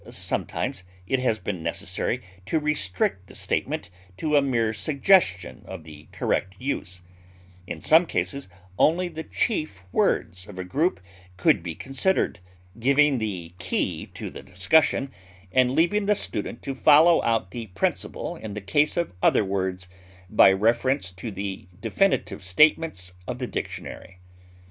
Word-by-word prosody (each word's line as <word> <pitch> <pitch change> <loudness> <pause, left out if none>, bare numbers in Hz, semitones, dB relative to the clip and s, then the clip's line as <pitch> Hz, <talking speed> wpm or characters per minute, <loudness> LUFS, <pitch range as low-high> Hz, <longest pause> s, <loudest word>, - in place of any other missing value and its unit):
Sometimes - - -2 0.2
it 130 +8 0
has 125 -4 +1
been 95 -5 -4
necessary - - -2 0.2
to 160 - +1
restrict 100 -10 0
the - - -13
statement - - -2 0.3
to 150 +4 0
a 145 - +6
mere 115 -5 +1
suggestion 110 - +2
of 95 -4 -8
the 75 0 -13
correct 95 0 -1
use; 100 -9 -4 0.7
in - - -6
some 165 +2 +5
cases 140 -8 -2 0.3
only 175 +3 +3
the 160 -1 -6
chief 155 - -2
words 90 +1 0
of 100 - -11
a 95 - -3
group 150 - 0 0.4
could 95 - +3
be 85 -2 -5
considered, 135 - 0 0.4
giving 140 +2 +4
the 90 -6 -4
key 90 0 -1
to - - -6
the - - -9
discussion, 135 - +2 0.4
and 130 +4 +3
leaving 200 +5 +2
the 210 - +4
student 105 - -4
to 135 - -3
follow 155 +5 +6
out 115 -5 0
the 115 -2 -6
principle 95 0 -2
in 105 -2 -7
the - - -3
case 145 - +1
of 170 - -1
other 105 - +4
words 95 -1 -2 0.4
by 105 -2 +7
reference 115 +2 +1
to 95 +5 -7
the 95 -2 -5
definitive 110 - 0
statements 95 - +2
of 125 - -3
the 125 - -3
dictionary. 95 -5 -6
115 Hz, 145 wpm, -25 LUFS, 95-150 Hz, 0.7 s, by